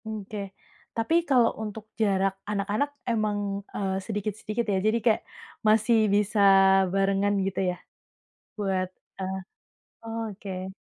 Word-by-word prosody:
Oke, 215 -1 -6 0.6
tapi 230 +9 +1
kalau 245 -4 +4
untuk 215 0 -6 0.2
jarak 195 -2 +2 0.2
anak-anak 210 +7 0 0.2
emang, 215 -2 0 0.3
eee, 190 -1 -2
sedikit-sedikit 215 +2 -3
ya - - +2
jadi 215 +3 +2
kayak 225 -3 +4 0.5
masih 220 +2 +4 0.2
bisa 210 +1 +1 0.5
barengan 195 +1 +2
gitu 195 -1 -2
ya? 180 - -3 0.8
Buat, 190 -2 0 0.3
eee, 190 0 -2 0.7
oke. 205 -4 -5
210 Hz, 110 wpm, -27 LUFS, 195-220 Hz, 0.8 s, kalau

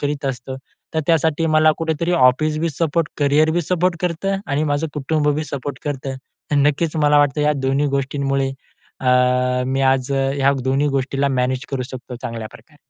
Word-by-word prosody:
करीत 145 0 -2
असतो. 130 0 -4 0.4
तर 160 - +2
त्यासाठी 165 0 +2
मला 155 0 +4
कुठेतरी 165 +2 -1
ऑफिसबी 155 +4 +3
सपोर्ट, 165 +1 0
करियरबी 155 +4 +3
सपोर्ट 180 +1 0
करतं 180 +3 -1
आणि 145 +2 0
माझं 145 +1 0
कुटुंबबी 150 +1 0
सपोर्ट 140 0 -5
करतं. 135 -2 -3 0.4
अ, - - +3
नक्कीच 150 +3 +1
मला 150 -1 +4
वाटतं 145 0 +2
या 150 0 +3
दोन्ही 135 +2 +1
गोष्टींमुळे 135 0 -1 0.5
अ, 130 - -4 0.6
मी 135 +1 -1
आज 135 0 +2
ह्या 135 0 +2
दोन्ही 135 +3 +1
गोष्टीला 135 0 0
मॅनेज 130 0 -1
करू 130 -2 -2
शकतो 125 -1 -8
चांगल्याप्रकारे. 115 +6 -8
145 Hz, 155 wpm, -20 LUFS, 135-155 Hz, 0.6 s, मला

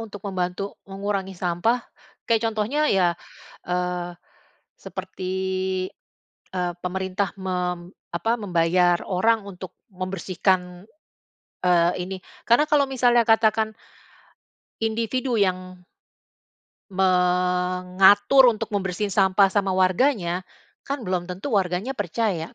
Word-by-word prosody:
untuk 205 -3 -8
membantu 185 +1 -3
mengurangi 195 0 -3
sampah. 180 +8 0 0.4
Kayak 230 -1 +2
contohnya 235 +8 0
ya, 185 -3 +4 0.6
eee, 180 0 -2 0.7
seperti, 185 0 -6 1.2
eee, 180 -1 -1
pemerintah 190 +1 -2
mem 180 -1 -3 0.2
apa, 200 +8 0
membayar 175 -2 +2
orang 220 +4 +2
untuk 185 -2 -9 0.2
membersihkan, 185 -1 -1 0.8
eee, 175 -1 +4
ini. 190 +1 -5 0.3
Karena 240 +5 +5
kalau 290 -2 +4
misalnya 245 -2 +3
katakan, 220 -1 +3 1.1
individu 230 +3 -1
yang 185 -2 -1 1.1
eee, 190 - -13
mengatur 180 +5 +4
untuk 215 - -5
membersihin 195 +1 -2
sampah 195 0 +4
sama 195 -2 +1
warganya, 185 -1 +2 0.5
kan 275 -3 -3
belum 180 -2 -2
tentu 190 +9 -5
warganya 185 +6 -1
percaya, 200 -5 -2
190 Hz, 100 wpm, -24 LUFS, 180-220 Hz, 1.2 s, Karena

